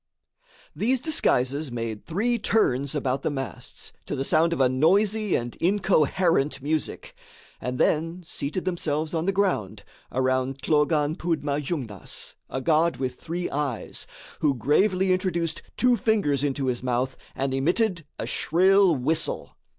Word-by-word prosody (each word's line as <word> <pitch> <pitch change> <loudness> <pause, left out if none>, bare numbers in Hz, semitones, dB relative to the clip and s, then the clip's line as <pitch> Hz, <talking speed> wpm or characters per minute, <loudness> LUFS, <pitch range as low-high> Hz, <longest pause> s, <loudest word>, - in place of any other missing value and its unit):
These 250 +4 +1
disguises 145 - +1
made 115 -3 -4
three 230 +8 0
turns 140 - +1
about 135 -2 0
the - - 0
masts, 135 -3 -6 0.2
to - - -2
the 135 - -1
sound 165 +4 +3
of 170 - -1
a 130 - +5
noisy 195 +10 +2
and 120 0 -3
incoherent 170 -6 +2
music, 150 +2 -3 0.5
and 125 0 -3
then 165 +6 +1
seated 160 +3 -4
themselves 160 -3 -1
on 165 +2 -1
the - - +4
ground, 190 - 0 0.3
around 130 +1 0
Thlogan 150 0 +2
Pondma 150 -4 -1
Jungnas, 130 - -5 0.2
a 130 - -3
god 160 +3 +2
with 130 -1 -3
three 175 +2 -3
eyes, 140 -5 -3 0.3
who 145 -3 +2
gravely 185 - +2
introduced 175 -3 -1 0.2
two 250 -1 +4
fingers 200 - +1
into 140 -1 0
his 125 -2 -1
mouth 125 +1 -1 0.2
and 135 0 -1
emitted 175 +6 +1
a - - -3
shrill 190 +1 +4
whistle. 155 +5 -1
155 Hz, 140 wpm, -25 LUFS, 135-185 Hz, 0.5 s, a